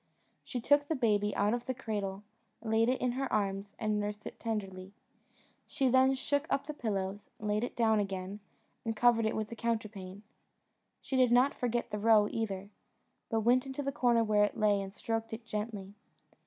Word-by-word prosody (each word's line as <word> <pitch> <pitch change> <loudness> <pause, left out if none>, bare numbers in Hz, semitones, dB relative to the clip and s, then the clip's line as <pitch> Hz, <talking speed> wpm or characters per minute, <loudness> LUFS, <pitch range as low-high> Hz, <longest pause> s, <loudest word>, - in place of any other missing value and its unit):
She 250 - -4
took 285 +4 +3
the 320 - 0
baby 210 -5 +1
out 205 +2 +2
of 240 0 -3
the 260 - -1
cradle, 205 -5 -4 0.4
laid 225 +1 +2
it 255 - +1
in 250 - +1
her 265 +1 -3
arms, 200 0 -1
and 215 -1 0
nursed 210 0 -4
it - - -8
tenderly. 195 -4 -4 0.7
She 265 -2 +1
then 260 +1 +5
shook 285 +3 -1
up 275 - 0
the 300 - -5
pillows, 200 -6 -3
laid 210 +1 0
it 245 - -4
down 220 -2 +3
again, 195 0 -3 0.4
and 225 -1 -2
covered 230 0 +4
it - - -1
with 215 -1 -2
the 235 - -6
counterpane. 215 -4 -4 0.8
She 265 - -2
did 255 -2 +4
not 250 +3 +5
forget 240 -1 -2
the 210 - -2
roe 215 -1 +5
either, 200 -3 -3 0.6
but 225 -2 +1
went 250 +4 +3
into 270 +2 -4
the 275 - -1
corner 240 -3 +3
where 210 -1 +3
it 205 - 0
lay, 210 -2 +3
and 195 0 -6
stroked 225 +2 -3
it 225 +1 -7
gently. 210 -3 -5
220 Hz, 190 wpm, -32 LUFS, 205-245 Hz, 0.8 s, then